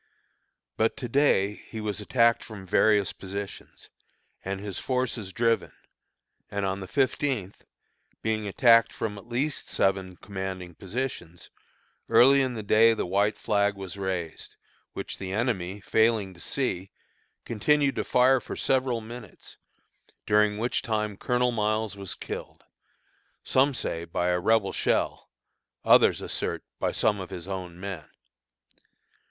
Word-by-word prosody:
But 110 +3 +1
to 130 -3 -4
day 115 -6 +3
he 110 +1 -9
was 105 -1 -3
attacked 115 +2 +3
from 105 -4 -10
various 105 +1 +3
positions, 100 +1 -8 0.5
and 95 0 -3
his 100 -2 -5
forces 125 -6 -2
driven; 115 +2 +1 0.8
and 100 -1 -2
on 95 0 -1
the 95 - -7
fifteenth, 130 -5 -1 0.6
being 110 -1 -1
attacked 115 +2 +5
from 105 -2 -4
at 105 - -16
least 135 +5 -2
seven 95 -1 0
commanding 95 -3 -6
positions, 95 -3 -5 0.6
early 125 +4 +6
in 130 -2 -1
the 110 - -5
day 115 +2 +5
the - - -2
white 100 +4 +1
flag 100 -1 +1
was 95 -2 -7
raised, 95 -4 -4 0.4
which - - -6
the 95 -1 -5
enemy 100 -3 -1
failing 110 -2 +2
to 85 - -16
see, 95 -5 -2 0.6
continued 140 +4 +2
to - - 0
fire 130 +1 +4
for - - -6
several 130 -3 +1
minutes, 115 -2 -11 0.7
during 105 0 +3
which 120 +3 0
time 105 -2 -1
Colonel 125 +4 +1
Miles 110 -2 0
was 100 -2 -5
killed, - - -7 0.8
some 135 +1 +3
say 85 -7 -2
by 90 +1 -1
a 90 0 +2
Rebel 105 +1 +2
shell, - - 0 0.6
others - - +6
assert - - -3 0.2
by - - 0
some 105 -2 +1
of 95 - -6
his 90 -2 -7
own 90 -3 -6
men. 95 -5 -6
105 Hz, 135 wpm, -27 LUFS, 95-120 Hz, 0.8 s, early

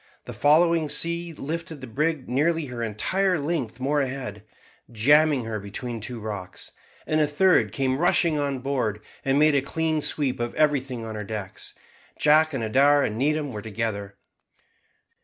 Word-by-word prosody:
The - - -7
following 160 +1 +3
sea 170 +2 +3
lifted 160 +1 -6
the 130 - -8
brig 145 +3 -2
nearly 160 +5 +1
her 125 -3 -6
entire 180 - 0
length 140 -6 -3
more 145 +3 +1
ahead, 130 -7 -5 0.5
jamming 145 +3 +3
her 110 -1 -4
between 115 +4 -5
two 120 +2 -5
rocks, 100 -4 -6 0.3
and 155 0 +1
a 150 - +3
third 150 - +3
came 130 +1 -1
rushing 170 -2 +2
on 140 -3 -2
board, 125 -6 -2 0.2
and 135 0 +1
made 155 +1 +5
a 140 - +3
clean 160 +2 -1
sweep 140 -4 0
of 120 0 -3
everything 135 -6 0
on 110 - -6
her 105 -1 -5
decks. 100 -2 -7 0.4
Jack 155 +1 +4
and 135 -5 -3
Adair 140 +6 +4
and 105 - -2
Needham 150 +1 0
were 105 - -6
together. 100 -2 -4
135 Hz, 160 wpm, -25 LUFS, 115-155 Hz, 0.5 s, made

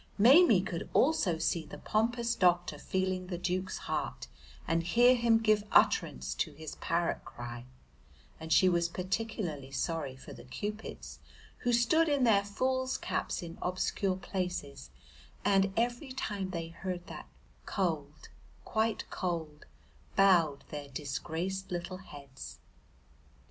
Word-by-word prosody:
Maimie 245 - +7
could 170 -3 -4
also 215 - +3
see 165 0 0
the 150 - -10
pompous 235 +2 0
doctor 175 -3 +2
feeling 185 -1 -1
the 180 -1 -3
Duke's 185 +2 -2
heart - - -3 0.4
and 165 0 +2
hear 240 +9 +5
him 235 -2 +4
give 215 -2 +3
utterance 65 0 +3
to 65 - -2
his 155 0 -8
parrot 170 0 -1
cry, 120 0 -8 0.7
and 160 0 -7
she 185 - +6
was 170 -1 +2
particularly 185 -6 -3
sorry 140 0 -2
for 130 - -11
the - - -11
Cupids, 210 - -6 0.4
who 245 - 0
stood 275 +8 +4
in 285 -3 +2
their 210 -4 +5
fools' 260 +5 -1
caps - - -2
in 170 -1 -8
obscure 185 +1 0
places 180 - -4 0.6
and, 195 -1 +4
every 240 +3 0
time 205 -7 -3
they 165 -3 -4
heard 175 +1 -5
that - - -9 0.4
"Cold, 155 -6 -2 0.4
quite 220 0 0
cold," 160 -5 -4 0.5
bowed 175 -7 +4
their 145 -1 -6
disgraced 160 +8 -4
little 175 0 -4
heads. 140 -7 -10
185 Hz, 130 wpm, -31 LUFS, 165-215 Hz, 0.7 s, Maimie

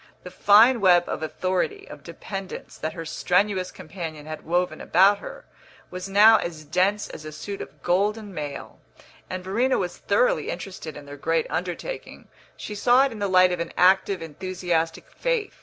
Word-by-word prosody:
The 180 - -9
fine 225 +4 +5
web 175 -2 +6
of - - -4
authority, 185 - -2
of - - -11
dependence, 195 -2 -8
that 155 - -3
her 165 -2 -7
strenuous 185 +2 0
companion 160 -3 -8
had 155 0 -7
woven 175 +2 -1
about 195 +3 +4
her, - - -10 0.5
was 185 +1 -6
now 215 +3 +7
as 165 -5 -5
dense 185 +7 +1
as 155 - -9
a 155 - -7
suit 195 +6 -7
of - - -11
golden 205 +3 0
mail; 150 -3 -7 0.5
and 185 0 -5
Verena 235 +8 +1
was 180 -2 -3
thoroughly - - +1
interested 175 -6 -7
in 145 - -11
their 145 0 -10
great 165 +2 0
undertaking; 185 - -5 0.3
she 210 - -7
saw 245 +5 +4
it 275 - -2
in 225 - -8
the 200 - 0
light 185 -1 +5
of 180 - -2
an 170 - -4
active, 190 0 +3
enthusiastic 165 0 -3
faith. - - -2
185 Hz, 175 wpm, -24 LUFS, 165-205 Hz, 0.5 s, now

